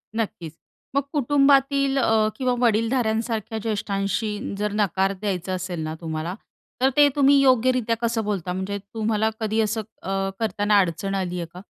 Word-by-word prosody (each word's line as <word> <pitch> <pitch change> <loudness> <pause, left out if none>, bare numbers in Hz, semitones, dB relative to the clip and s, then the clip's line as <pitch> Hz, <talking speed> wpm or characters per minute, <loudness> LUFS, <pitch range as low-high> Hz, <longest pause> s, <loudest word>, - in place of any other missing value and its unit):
नक्कीच. 205 -8 -3 0.4
मग 280 - +4
कुटुंबातील 275 0 +3
अ, 220 -3 +3
किंवा 255 -2 0
वडीलधाऱ्यांसारख्या 225 -1 0
ज्येष्ठांशी 205 0 -1 0.2
जर 210 0 -1
नकार 195 -1 +1
द्यायचा 185 -2 -2
असेल 180 -1 -4
ना 155 0 -4
तुम्हाला, 160 +2 -4 0.5
तर 265 - +5
ते 290 0 +8
तुम्ही 280 0 +5
योग्यरीत्या 255 -3 +3
कसं 230 -1 0
बोलता? 190 -4 -2
म्हणजे 190 +2 -3
तुम्हाला 220 +1 -1
कधी 220 0 -1
असं 220 +1 0 0.2
अ, 195 0 -1
करताना 210 -2 +2
अडचण 190 +2 -1
आली 180 -2 -2
आहे 170 - -3
का? 180 - -9
215 Hz, 150 wpm, -23 LUFS, 195-235 Hz, 0.5 s, ते